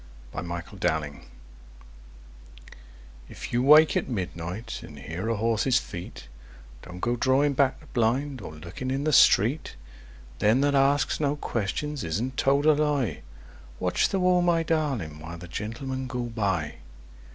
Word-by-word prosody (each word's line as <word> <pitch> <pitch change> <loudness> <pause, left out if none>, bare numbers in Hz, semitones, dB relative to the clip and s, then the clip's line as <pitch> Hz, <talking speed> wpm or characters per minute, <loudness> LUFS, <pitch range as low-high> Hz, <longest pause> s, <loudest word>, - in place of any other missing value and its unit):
A - - -4
SMUGGLERS' 85 0 -7
SONG 75 -2 -1 2.1
If - - -8
you 120 - +2
wake 150 +4 +7
at - - -1
midnight, 95 +1 -5
and 75 - -11
hear 80 - -5
a 115 - +1
horse's 115 +3 +2
feet, 85 - -7 0.5
Don't 90 0 -10
go 120 +1 +1
drawing 135 +4 +2
back 135 0 +2
the 155 - -17
blind, 130 +1 0
or 90 - -7
looking 85 +11 -7
in 135 +2 -1
the 155 0 +1
street, 125 +8 +4 0.6
Them 110 +5 +3
that 145 0 +2
ask 140 +1 +2
no 145 -1 +1
questions 145 +3 -3
isn't 115 +11 -2
told 140 +2 +2
a 155 - +7
lie. 145 -5 0 0.6
Watch 90 -1 +1
the 195 - 0
wall, 180 -1 +3
my 170 -1 +2
darling, 135 - -1
while 80 +2 -8
the 90 +1 -10
Gentlemen 130 +8 -5
go 125 -1 -3
by! 100 -10 -2
120 Hz, 150 wpm, -26 LUFS, 90-140 Hz, 2.1 s, wake